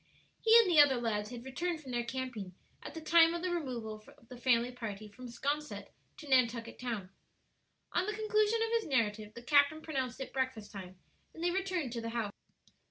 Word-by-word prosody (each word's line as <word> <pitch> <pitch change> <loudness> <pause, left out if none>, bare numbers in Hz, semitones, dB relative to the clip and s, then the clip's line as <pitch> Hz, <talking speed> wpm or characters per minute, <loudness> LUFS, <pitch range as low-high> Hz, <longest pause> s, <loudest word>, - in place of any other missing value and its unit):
He 450 0 +7
and 460 -3 +7
the 340 -4 +5
other 270 -4 +4
lads 210 -3 -1
had 240 0 -8
returned 335 +5 -2
from 270 -4 -9
their 240 -1 0
camping 235 -7 -5 0.3
at - - -9
the 325 - -5
time 330 +1 +5
of 340 - -4
the 365 - 0
removal 235 -10 -4
of 230 - -23
the 250 - -8
family 240 0 +2
party 215 -4 -6
from 250 +5 -10
'Sconset 285 +5 -3 0.3
to 300 - -10
Nantucket 235 -3 +2
Town. 220 -7 -4 0.8
On 370 - +1
the 425 - -1
conclusion 430 +1 +2
of 455 - -1
his 460 -5 +1
narrative 215 -4 0
the 235 - -9
captain 285 +3 +4
pronounced 265 -5 -3
it 265 - -6
breakfast 260 -5 -2
time, 185 -2 -9 0.4
and 325 - -7
they 350 - +2
returned 365 -7 -1
to 235 - -3
the 230 - -4
house. 225 -3 -2
255 Hz, 200 wpm, -33 LUFS, 230-325 Hz, 0.8 s, He